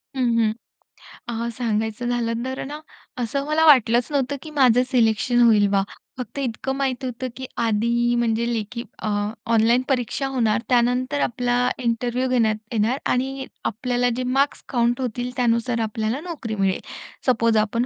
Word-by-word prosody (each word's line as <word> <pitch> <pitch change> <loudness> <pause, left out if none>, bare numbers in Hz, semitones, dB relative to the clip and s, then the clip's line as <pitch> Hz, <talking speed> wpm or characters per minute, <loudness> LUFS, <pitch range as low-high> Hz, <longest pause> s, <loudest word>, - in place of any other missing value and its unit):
हं, 260 - -1 0.2
हं. 220 -1 +2 0.7
अ, 235 0 -2
सांगायचं 225 0 -1
झालं 235 -1 -1
तर 260 0 -4
ना, 295 +2 -6 0.4
असं 275 +4 -2
मला 315 +1 +3
वाटलंच 245 -4 +5
नव्हतं 280 0 0
की 310 - -9
माझं 250 -4 +4
सिलेक्शन 240 0 +3
होईल 215 -3 +5
बा. 195 -1 +3 0.3
फक्त 250 +2 -6
इतकं 265 +1 -2
माहीत 265 -1 -1
होतं 255 +1 -4
की 260 - -6
आधी 235 +1 +1
म्हणजे 235 0 +1
लेखी 230 +2 -4 0.2
अ, - - -3 0.5
ऑनलाईन 230 +3 +4
परीक्षा 265 +1 0
होणार 230 -3 +1
त्यानंतर 250 +3 +2
आपला 245 +1 0 0.3
इंटरव्ह्यू 240 +2 0
घेण्यात 225 -4 +2 0.2
येणार 230 +4 +1
आणि 265 +1 -1 0.2
आपल्याला 245 +2 0
जे 255 - -2
मार्क्स 270 +3 0
काउंट 240 0 +1
होतील, 245 0 -3
त्यानुसार 235 0 +1
आपल्याला 220 +3 -2
नोकरी 290 -11 -5
मिळेल. 195 -2 +1 0.5
सपोज 230 -2 +3
आपण 220 +3 +1
240 Hz, 150 wpm, -23 LUFS, 225-255 Hz, 0.7 s, वाटलंच